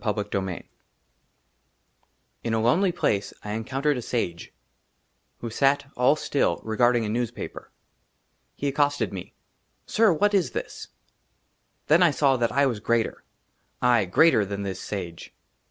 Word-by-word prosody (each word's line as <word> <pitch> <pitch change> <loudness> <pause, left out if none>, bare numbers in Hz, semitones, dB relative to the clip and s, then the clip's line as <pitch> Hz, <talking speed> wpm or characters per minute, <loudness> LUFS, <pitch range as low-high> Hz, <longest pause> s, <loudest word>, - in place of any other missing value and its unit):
II 105 -2 0
XI 95 -3 -3 1.8
IN 115 -1 0
A - - +1
LONELY 165 - +3
PLACE, 100 - -1
I 105 - -5
ENCOUNTERED 130 +6 -1
A - - -3
SAGE 90 -8 -3 0.9
WHO 115 - -5
SAT, 140 +3 +1
ALL 125 +4 +4
STILL, 140 - 0
REGARDING 120 +1 +2
A - - -3
NEWSPAPER. 120 +1 -4 0.8
HE 145 - -3
ACCOSTED 145 -7 0
ME: 95 - -8 0.2
" - - -46
SIR, 220 -4 +3
WHAT 205 +6 +2
IS 190 -4 +1
THIS? - - -6 0.5
" - - -46
THEN 160 +4 +5
I 175 - +6
SAW 140 -3 +2
THAT 115 -2 0
I 140 +3 +3
WAS 120 -6 -1
GREATER, 115 +2 -1 0.6
AYE, 120 -4 +4
GREATER 110 - +4
THAN 100 0 -4
THIS 95 -2 -4
SAGE. 90 -5 -6
120 Hz, 145 wpm, -25 LUFS, 105-145 Hz, 1.8 s, I